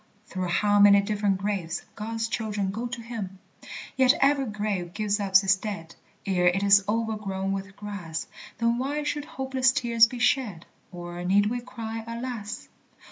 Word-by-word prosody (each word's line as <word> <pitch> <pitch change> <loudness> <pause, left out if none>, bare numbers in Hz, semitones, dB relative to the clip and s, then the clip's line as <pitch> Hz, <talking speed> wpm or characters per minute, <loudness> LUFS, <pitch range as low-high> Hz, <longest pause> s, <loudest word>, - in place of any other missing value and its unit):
through 185 -3 -4
how 205 +4 +2
many 200 0 +8
different 200 -1 0
graves 195 -4 -3
God's 225 +1 -3
children 210 -4 -2
go 230 +5 -3
to 240 0 -6
him!) 215 -5 -6 0.6
Yet 260 +1 +5
every 275 -1 +3
grave 205 -4 -3
gives 210 -1 0
up 195 -2 -3
its 195 0 +6
dead 190 -6 -6 0.3
Ere 180 -3 +2
it 185 +3 +2
is 200 0 +6
overgrown 210 -4 -1
with 195 0 -5
grass; 200 -6 -5 0.3
Then 235 +1 +1
why 290 +3 -2
should 295 0 -2
hopeless 265 -3 +1
tears 235 -3 +4
be 245 - -7
shed, 240 - +1 0.3
Or 175 -1 -7
need 205 +4 +3
we 245 0 -2
cry, 225 -2 -6
"Alas"? 230 -3 -5
210 Hz, 160 wpm, -26 LUFS, 195-235 Hz, 0.6 s, many